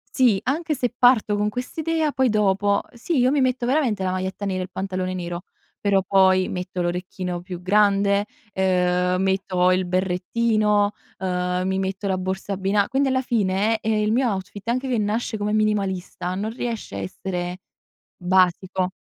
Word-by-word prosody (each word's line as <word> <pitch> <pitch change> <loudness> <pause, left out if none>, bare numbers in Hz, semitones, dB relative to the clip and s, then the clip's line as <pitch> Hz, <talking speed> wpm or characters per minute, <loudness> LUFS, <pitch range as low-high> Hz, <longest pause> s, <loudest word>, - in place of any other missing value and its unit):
Sì, 240 -7 +4
anche 305 +4 0
se 245 -3 -1
parto 245 -4 +4
con 210 0 +1
quest'idea 310 +7 -2
poi 260 -2 +2
dopo, 205 -1 +2
ehm, - - -17
sì, 310 +7 -1
io 250 - +4
mi 285 +1 +2
metto 255 -1 +1
veramente 250 -8 +1
la 185 - 0
maglietta 185 +2 -3
nera 190 -2 -1
e - - -1
il 185 - -9
pantalone 185 -1 -3
nero, 175 -1 -5 0.4
però 200 -1 +2
poi 190 -1 +3
metto 180 0 -4
l'orecchino 180 0 -3
più 180 -1 -7
grande, 200 +1 +3 0.3
ehm, 180 -1 +1
metto 190 -1 +2
il 185 0 +1
berrettino, 205 +3 +1 0.3
uhm, 180 -1 -1
mi 190 0 0
metto 190 +1 -2
la 190 -1 0
borsa 190 +2 -3
abbina 195 +1 +1
quindi 270 +1 +1
alla 260 0 +1
fine, 215 -2 +1
ehm, 220 - 0
il 215 0 +1
mio 250 +3 +2
outfit 195 +2 -6
anche 255 +3 0
che 245 - +1
nasce 215 +2 -1
come 210 0 -1
minimalista 195 -4 -1
non 200 +4 -2
riesce 230 - -5
a - - -3
essere 180 - -4 0.6
basico. 185 0 +1
195 Hz, 170 wpm, -23 LUFS, 185-220 Hz, 0.6 s, Sì